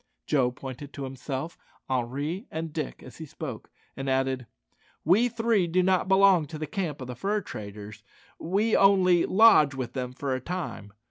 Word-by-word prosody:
Joe 130 -4 +2
pointed 135 +2 -9
to 140 - -6
himself, 135 +4 -5 0.3
Henri, 140 - -2
and 160 -1 -5
Dick 155 -4 -5
as - - -12
he 160 - -7
spoke, 140 -5 -7 0.3
and 135 0 -4
added, 130 -1 0 0.6
"We 210 +10 +4
three 225 -5 +1
do 180 +2 +2
not 185 0 +2
belong 190 -4 +5
to 155 - -7
the 155 - -4
camp 155 -4 -4
of 130 - -6
the 125 - -6
fur 205 - -1
traders; 105 - -9 0.4
we 200 +6 +1
only, 185 -3 +4
lodge 185 -9 +6
with 130 -2 -5
them 125 -1 -4
for 135 +1 -3
a 130 - -3
time. 170 - -5
150 Hz, 175 wpm, -27 LUFS, 130-185 Hz, 0.6 s, lodge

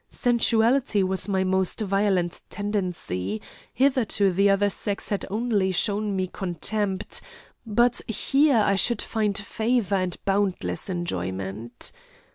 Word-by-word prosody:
Sensuality 235 -2 +2
was 190 0 -1
my 190 -2 +1
most 190 +1 0
violent 195 -3 +1
tendency; 180 - -3 0.3
hitherto 255 -7 +2
the 195 +3 +3
other 200 +1 +3
sex 200 0 -2
had 205 - -2
only 210 -2 +1
shown 205 +2 0
me 185 -1 0
contempt, 190 +2 -3 0.5
but 240 +3 +2
here 270 +2 +3
I 200 - +3
should 235 +4 +2
find 210 -2 -1
favour 220 -1 0
and 185 -2 -2
boundless 195 -1 0
enjoyment. 95 - -4
200 Hz, 115 wpm, -25 LUFS, 185-220 Hz, 0.5 s, the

